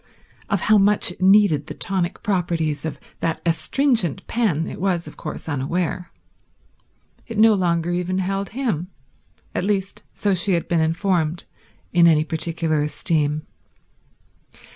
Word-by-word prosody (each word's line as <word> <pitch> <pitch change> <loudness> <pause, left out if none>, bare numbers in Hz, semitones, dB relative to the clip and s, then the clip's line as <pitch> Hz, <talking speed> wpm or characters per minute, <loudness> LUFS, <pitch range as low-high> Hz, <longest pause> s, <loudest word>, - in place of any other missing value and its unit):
Of 200 -4 +1
how 215 -1 +4
much 200 -1 +3
it 180 - -13
needed 190 -6 +4
the - - -6
tonic 185 -3 -2
properties 165 -6 -1
of 160 - -4 0.2
that 165 -1 -1
astringent 195 - +1
pen 195 -10 0
it - - -7
was 180 -3 0
of - - -11
course 155 - -7
unaware. 165 +5 -2 1.2
It 230 - -6
no 220 +1 +6
longer 175 -3 0
even 180 +1 -1
held 195 +1 -2
him—at 180 - -6
least, 195 -1 -1
so 200 -1 0
she 185 +1 +2
had 170 - 0
been 170 -2 +1
informed—in 170 0 0
any 155 -2 +4
particular 160 -1 -1
esteem. 150 0 -1
175 Hz, 130 wpm, -22 LUFS, 160-195 Hz, 1.2 s, no